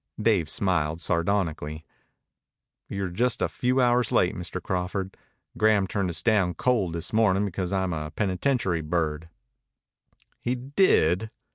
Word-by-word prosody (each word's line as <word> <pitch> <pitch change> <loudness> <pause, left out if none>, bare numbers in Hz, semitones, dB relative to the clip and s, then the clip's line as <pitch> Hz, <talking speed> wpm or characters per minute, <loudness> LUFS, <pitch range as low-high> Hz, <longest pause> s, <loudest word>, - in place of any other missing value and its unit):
Dave 105 -8 +2
smiled 80 -4 0
sardonically. 85 -3 -1 1.0
"You're 100 -1 -3
just 120 +6 0
a - - +1
few 130 0 0
hours 120 -2 +3
late, 90 - +3
Mr. 90 +1 -5
Crawford. 95 +1 -3 0.4
Graham 105 -2 +4
turned 95 -1 -1
us 85 - -3
down 100 -6 +2
cold 105 -5 +1
this 85 +4 -4
morning 105 -3 +3
because 95 -1 -3
I'm 95 -2 0
a 75 -1 -4
penitentiary 95 - 0
bird." 80 0 -2 1.1
"He 125 +1 -1
did?" 120 - +2
95 Hz, 130 wpm, -26 LUFS, 85-110 Hz, 1.1 s, Graham